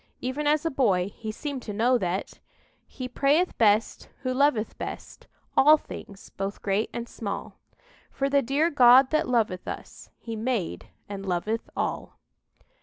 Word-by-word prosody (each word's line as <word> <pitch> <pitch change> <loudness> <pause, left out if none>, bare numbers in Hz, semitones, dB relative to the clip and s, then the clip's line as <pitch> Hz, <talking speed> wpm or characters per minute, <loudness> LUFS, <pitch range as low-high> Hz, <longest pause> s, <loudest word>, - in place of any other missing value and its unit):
Even 270 +4 -2
as 300 +2 +2
a 330 - +1
boy 200 -9 +1
he 220 -1 -5
seemed 280 +3 -5
to 210 - -6
know 235 +5 +3
that 185 0 -3 0.5
"He 255 - -6
prayeth 285 +8 +2
best 215 0 +2
who 255 -1 -1
loveth 255 -5 +1
best - - -7 0.3
All 305 +3 +7
things 200 -8 -11
both 195 +1 -5
great 200 +2 0
and 235 0 -5
small; 205 -4 -6 0.5
For 275 - -1
the 280 0 +3
dear 285 +7 +1
God 255 0 +7
that 310 -4 +1
loveth 215 -7 0
us, - - -8
He 230 -1 -7
made 225 -5 -2 0.2
and 200 -1 -6
loveth 195 +5 -2
all." - - -3
240 Hz, 155 wpm, -26 LUFS, 205-275 Hz, 0.5 s, All